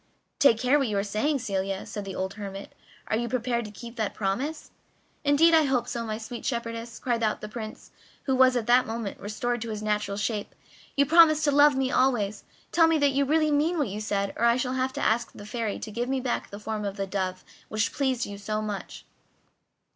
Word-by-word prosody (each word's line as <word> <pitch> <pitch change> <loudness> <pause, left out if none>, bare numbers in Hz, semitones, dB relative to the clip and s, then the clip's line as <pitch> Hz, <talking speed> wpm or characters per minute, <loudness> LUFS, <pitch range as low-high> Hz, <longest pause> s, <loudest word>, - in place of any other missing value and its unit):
"Take 255 -6 +6
care 255 +5 +3
what 270 - +1
you 210 -2 -1
are 200 - +1
saying, 215 +9 0
Celia," 195 -5 -2
said 205 -1 -6
the 190 -1 -6
old 190 +1 -3
hermit; 200 -1 -7 0.3
"are - - -1
you 235 +1 -2
prepared 240 -2 -1
to - - -7
keep 235 +2 -10
that 215 -3 -2
promise?" 255 +11 -2 0.5
"Indeed, 300 +3 +5
I 320 -2 +6
hope 250 -3 +1
so, 235 -1 -3
my 215 0 -2
sweet 230 +2 -7
shepherdess," 235 -1 -4
cried 240 -2 -1
the 215 -1 -1
Prince, 220 0 -8 0.3
who 265 - +1
was 260 0 +5
at 240 -3 0
that 245 +2 +4
moment 225 -2 -4
restored 240 +3 -2
to 230 - -4
his 215 -1 -4
natural 210 -1 -1
shape. 210 0 -3 0.4
"You 280 - +5
promised 310 0 +6
to 295 - +3
love 290 0 +6
me 265 -1 0
always; 215 -6 +1 0.3
tell 330 -1 +5
me 325 -1 +3
that 285 -2 +3
you 280 +1 +1
really 310 +2 +2
mean 310 +4 +2
what 285 -8 0
you 205 +2 -5
said, 200 -2 -1
or 235 - +2
I 235 +1 +4
shall 255 0 -1
have 260 0 0
to - - -2
ask 235 +1 +1
the 205 - -10
Fairy 220 -1 -3
to 220 - -7
give 240 +4 -2
me 270 0 0
back 250 -1 -2
the 200 - -8
form 215 0 -4
of 200 0 -4
the 195 - -1
dove 185 -1 -3 0.2
which 215 +1 0
pleased 260 -4 0
you 200 0 -8
so 215 +1 -2
much." 210 -2 -5
235 Hz, 225 wpm, -27 LUFS, 210-265 Hz, 0.5 s, Take